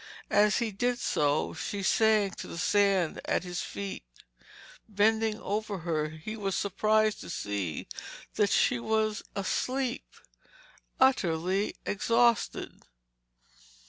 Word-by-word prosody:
As 210 0 +4
he 235 -2 -1
did 245 +5 0
so, 145 - 0
she 200 -1 -4
sank 215 -2 +3
to - - -6
the - - -7
sand 195 -2 +2
at - - 0
his 180 -1 -4
feet. 200 - -5 0.9
Bending 220 +1 +2
over 210 0 -3
her, 155 -3 0
he 160 +8 -7
was 195 -3 -2
surprised 215 +2 +1
to - - -9
see 100 - -3 0.5
that 205 -2 +2
she 250 - +3
was 220 -2 0
asleep—utterly 205 - -2
exhausted. 230 +3 +1
205 Hz, 110 wpm, -29 LUFS, 185-220 Hz, 0.9 s, As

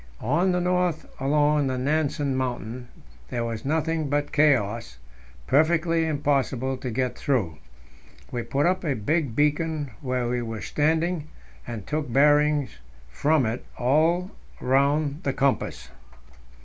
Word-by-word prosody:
On 170 - +1
the 180 - +1
north 180 -2 0 0.2
along 145 +1 +2
the 130 -1 -1
Nansen 145 0 0
Mountain 125 -1 -3 0.4
there 120 -2 -2
was 115 -1 -4
nothing 155 +1 0
but 145 +1 0
chaos, 115 - +2 0.5
perfectly 165 +2 +2
impossible 135 -3 0
to 130 0 -5
get 125 +2 -1
through. 95 - -1 0.7
We 120 - -2
put 140 +4 0
up 185 +1 +1
a 145 -5 0
big 140 +2 -1
beacon 150 0 0
where 125 -2 -1
we 120 0 -1
were 115 -2 -5
standing, 160 +1 0 0.4
and 115 -5 -6
took 150 -1 -3
bearings 145 - +3 0.3
from 145 - +2
it 115 +3 -3
all 160 +8 +2 0.3
round 140 +3 +1
the 135 - -1
compass. 135 - -1
145 Hz, 130 wpm, -25 LUFS, 125-155 Hz, 0.7 s, bearings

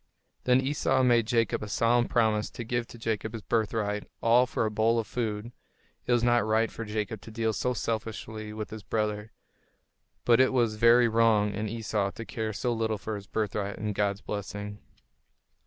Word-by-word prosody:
Then 125 0 +5
Esau 130 -1 +1
made 120 -3 +4
Jacob 115 -3 +1
a 105 - -5
solemn 115 +4 +2
promise 110 -2 +1
to 120 - -7
give 120 0 -2
to - - -12
Jacob 110 -1 -2
his 110 -2 -6
birthright, 105 -2 -1
all 120 +2 +4
for 115 - -1
a 110 - -1
bowl 110 +2 +2
of 115 - 0
food. 110 -1 -3 0.6
It - - 0
was 120 -1 +3
not 120 -3 +4
right 110 +1 +1
for 115 - -6
Jacob 105 0 -3
to - - -11
deal 110 0 -1
so 125 +5 -1
selfishly 110 -1 -4
with 110 0 -6
his 110 0 -7
brother; 105 0 -2 0.9
but 120 0 +5
it 130 0 +4
was 120 -4 +2
very 120 +2 +6
wrong 110 -2 +3
in 105 +1 -3
Esau 105 -3 -1
to 115 +3 -8
care 110 -1 -3
so 120 +4 -1
little 110 -1 -1
for 110 +2 -5
his 100 -1 -8
birthright 105 -2 -2
and 105 0 -2
God's 100 0 0
blessing. 105 0 -5
110 Hz, 190 wpm, -28 LUFS, 105-115 Hz, 0.9 s, very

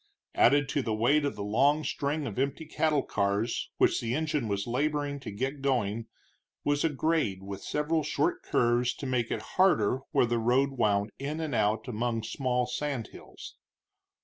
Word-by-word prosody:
Added 145 0 +4
to 145 - 0
the 110 -4 -1
weight 140 +7 +3
of 140 - -2
the 100 - -5
long 140 +9 +2
string 145 +1 -2
of 115 -2 -4
empty 140 +4 -1
cattle 155 -2 +1
cars 100 +3 -1
which - - +3
the 115 +1 -1
engine 150 -5 -1
was 100 -1 -1
laboring 145 +3 -1
to - - -7
get 135 +7 -3
going 115 -5 0 0.6
was 145 0 +1
a 165 - +3
grade, 150 - 0
with 100 0 -7
several 155 +2 0
short 350 - 0
curves 120 +1 +1
to - - -7
make 125 -3 0
it - - -3 0.2
harder 135 - +4
where - - +3
the 120 0 0
road 130 +4 +2
wound 105 -4 +1
in 145 +3 -3
and 155 -4 -3
out 110 +2 +1
among 115 -1 -2
small 125 +1 0
sand 125 -2 -3
hills. - - -12
130 Hz, 175 wpm, -29 LUFS, 115-145 Hz, 0.6 s, Added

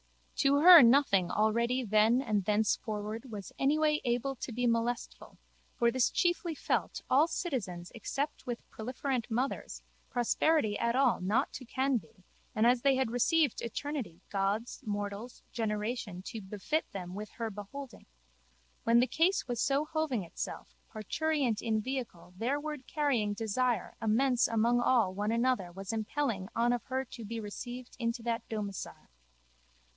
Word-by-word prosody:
To 280 0 +4
her 345 -1 +11
nothing 230 -8 +5
already 235 +4 +1
then 215 +2 +4
and 210 -5 0
thenceforward 215 +3 -1
was 200 -5 -7
anyway 300 +2 +2
able 245 +2 0
to 245 - -5
be 245 +2 -1
molestful 230 0 -2 0.4
for 235 0 +3
this 255 -1 +2
chiefly 345 -2 0
felt - - -1
all 285 +5 +4
citizens 195 - -4
except 275 +6 -4
with 240 -1 -5
proliferent 255 +1 -3
mothers 250 +4 -2 0.3
prosperity 245 -1 +1
at 235 +1 +1
all 260 -6 +3
not 215 +9 +1
to 255 - -7
can 260 +2 +1
be 185 -1 -12 0.3
and 215 +1 +3
as 240 0 +4
they 275 0 +4
had 260 -3 0
received 290 +3 +2
eternity 235 - -5
gods 200 +4 -1
mortals 205 +3 -5
generation 210 -4 -3
to 220 +2 -6
befit 210 +11 -2
them 180 -2 -6 0.2
her 230 -2 -3
beholding, 235 +6 -9 0.8
when 230 +1 +5
the 245 - +5
case 335 +6 +1
was 240 -2 -2
so 280 +2 +2
hoving 310 - -1
itself, 165 - -6 0.2
parturient 255 +1 -1
in 220 -1 0
vehicle 225 -8 -5
thereward 285 +5 -3
carrying 255 -9 +1
desire 225 +1 -1
immense 240 +3 +3
among 230 +2 +2
all 235 -7 +3
one 205 +3 -1
another 235 -6 +1
was 195 +4 -6
impelling 220 -3 -2
on 235 +1 +3
of 245 - -3
her 265 0 -2
to 235 - -10
be 225 +2 -5
received 240 +4 -7
into 230 0 -2
that 230 -1 -1
domicile. 205 -3 -5
235 Hz, 145 wpm, -31 LUFS, 215-265 Hz, 0.8 s, her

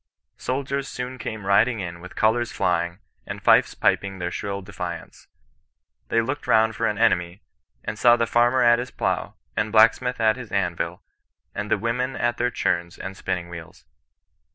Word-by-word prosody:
Soldiers 135 +1 -2
soon 125 0 -6
came 110 -3 -5
riding 105 +4 +3
in 85 -2 -5
with 90 +2 -11
colours 120 +2 +2
flying, 85 -2 0 0.3
and - - -5
fifes - - +4
piping 100 -1 +1
their 90 -1 -3
shrill 100 0 -4
defiance. 90 -3 -7 0.8
They 115 - +2
looked 130 +5 -4
round 110 -1 +4
for 115 +2 0
an 105 - -1
enemy, 90 +1 +1 0.4
and 105 - -5
saw 120 -1 +7
the 115 -1 +1
farmer 120 +2 +3
at 120 0 +5
his 125 +1 -4
plough, - - -2 0.2
the 105 - +1
blacksmith 115 +3 +3
at 110 +1 +3
his 125 -4 -9
anvil, 90 -3 -2 0.5
and - - -4
the - - +3
women 125 +3 -1
at 120 0 0
their 120 +1 +1
churns 85 -7 -1
and 95 - -6
spinning 90 -2 -3
wheels. 85 -1 -11
110 Hz, 170 wpm, -24 LUFS, 90-120 Hz, 0.8 s, saw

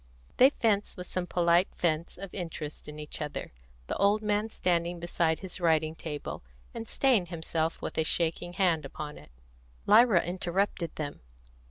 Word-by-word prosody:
They 260 - +8
fenced 210 -8 0
with 180 - -5
some 180 0 -3
polite 175 +1 +3
feints 165 -1 0
of 195 0 -7
interest 165 -5 -5
in 150 0 -8
each 150 0 -6
other, 150 -1 -4 0.3
the - - -3
old 205 +2 +3
man 210 +1 +1
standing 175 -3 0
beside 170 -1 0
his 190 -1 -5
writing 160 -2 +2
table, 155 -2 -6 0.3
and 230 -1 -6
staying 245 -10 +3
himself 165 -1 -2
with - - -3
a - - +4
shaking 170 +2 0
hand 175 -4 +2
upon 150 +2 -7
it. 75 - -16 0.6
Lyra 215 -3 +6
interrupted 175 -1 -1
them. 145 -2 -4
175 Hz, 160 wpm, -29 LUFS, 160-195 Hz, 0.6 s, They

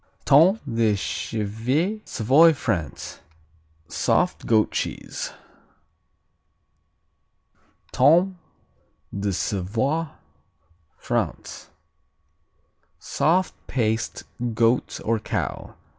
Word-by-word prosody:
Tome 175 +10 +6
de 115 -2 +2
Chèvre 115 - -2
Savoy, 135 +8 +5
France 90 - -4 0.7
Soft - - 0
goat 110 -2 +3
cheese. - - -4 2.6
Tome 175 +7 +4 0.8
de 100 0 -1
Savoie 110 - -1 0.9
France - - -3 1.3
Soft 180 +4 +1
paste; 115 -3 -1 0.3
goat 115 +2 +1
or 115 0 +1
cow. 105 - -4
115 Hz, 65 wpm, -24 LUFS, 110-160 Hz, 2.6 s, Tome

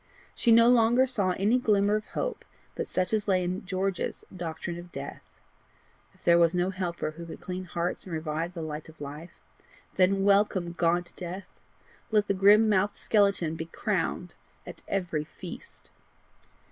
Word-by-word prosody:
She 235 - +2
no 230 +1 +7
longer 240 +1 +5
saw 200 -8 0
any 215 +6 +3
glimmer 205 -3 +3
of 215 0 -3
hope - - -3 0.3
but - - -4
such 185 +3 -1
as 215 -1 0
lay 185 -2 +3
in 180 +1 -3
George's 190 0 -2
doctrine 170 0 -5
of 175 0 -11
death. 140 -2 -7 0.9
If - - -25
there 170 0 +5
was 170 +1 +4
no 180 +1 +1
helper 175 -4 -3
who 170 +2 -9
could - - -8
clean 185 0 -5
hearts 175 0 -3
and 185 - -7
revive 160 +2 -3
the 165 - -4
light 155 0 -6
of 160 - -16
life, 150 +4 -8 0.6
then 195 +1 +3
welcome 200 -3 +3
gaunt 175 0 0
death! 185 +2 -8 0.5
let 210 -2 +2
the - - +2
grim 205 +3 +6
mouthed 205 0 +2
skeleton 200 -6 +2
be 160 - -4
crowned 180 -1 -2 0.3
at - - -10
every 180 -6 -1
feast! - - -10
185 Hz, 165 wpm, -28 LUFS, 170-205 Hz, 0.9 s, no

